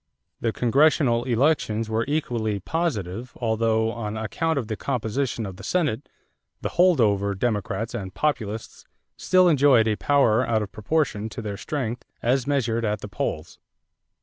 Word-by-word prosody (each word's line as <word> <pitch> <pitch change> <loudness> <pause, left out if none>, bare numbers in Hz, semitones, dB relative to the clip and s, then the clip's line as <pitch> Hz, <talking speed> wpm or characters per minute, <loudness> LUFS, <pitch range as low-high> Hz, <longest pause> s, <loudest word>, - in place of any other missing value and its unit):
The 115 - 0
congressional 125 0 +3
elections 120 -3 +1
were 110 +1 0
equally 120 -8 -1
positive 120 - -3
although, 110 -1 +1
on 110 -2 -4
account 160 +8 -1
of 130 - -1
the 110 - -3
composition 120 -1 -2
of 95 -2 -7
the 95 - -11
Senate, 145 - -1 0.5
the - - -2
"hold 180 -4 +4
over" 100 -3 +2
Democrats 110 +1 -2
and 95 -6 -5
Populists 110 -5 -3 0.3
still 185 -1 +4
enjoyed 140 -7 +5
a 110 - +2
power 130 -5 +3
out 110 -3 +1
of 100 - -8
proportion 110 -2 -1
to 110 - -7
their 105 -2 -4
strength 125 0 -4 0.2
as 125 +2 +1
measured 120 -5 0
at 105 -2 -1
the - - -6
polls. 75 - -4
115 Hz, 150 wpm, -24 LUFS, 110-140 Hz, 0.5 s, enjoyed